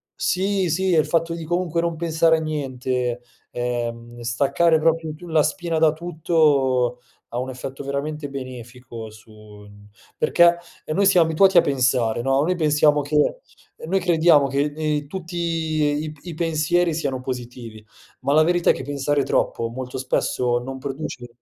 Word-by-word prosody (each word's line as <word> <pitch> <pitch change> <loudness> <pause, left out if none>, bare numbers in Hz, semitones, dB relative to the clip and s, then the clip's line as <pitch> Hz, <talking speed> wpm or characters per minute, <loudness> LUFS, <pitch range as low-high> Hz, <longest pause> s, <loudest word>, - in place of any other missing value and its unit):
sì, 190 -1 0
sì, 185 +3 +1
e 160 - +5
il - - +2
fatto 165 0 0
di 165 -1 -6
comunque 175 0 -1
non 170 -1 -1
pensare 165 0 +2
a - - -2
niente, 130 -5 -2 0.3
ehm, 120 -1 -4
staccare 140 +7 +2
proprio 160 0 +1
tu 175 +3 -12
la 160 -2 +3
spina 165 +1 -2
da 160 -1 +5
tutto, 150 -7 +1 0.3
ha 120 - -5
un 130 +1 -4
effetto 135 +2 -7
veramente 145 +2 -4
benefico 125 -3 -8
su 110 +1 -17 0.3
n 105 0 -16 0.3
perché, 170 0 +4 0.3
e - - -3
noi 200 +5 +2
siam 185 -4 +5
abituati 180 +4 +4
a - - +9
pensare, 125 -5 +1
no, 135 +2 +2
noi 180 +4 0
pensiamo 150 -2 +3
che 150 - +1 0.4
ehm, - - -9
noi 195 +1 +2
crediamo 165 -4 +4
che, 135 +1 0
ehm, 155 - -12
in 150 -2 -1
tutti 175 +2 -7
i 155 -3 -1
i 175 -2 -7
pensieri 165 +1 +1
siano 140 -5 -2
positivi, 120 -4 -7 0.4
ma 135 +2 -1
la 155 - +6
verità 175 +1 +2
è - - +1
che 130 - -7
pensare 145 +1 -1
troppo 115 -3 0
molto 130 +1 -6
spesso 125 -1 0
non 130 +2 -7
produce 135 -2 -6
150 Hz, 170 wpm, -22 LUFS, 130-165 Hz, 0.4 s, a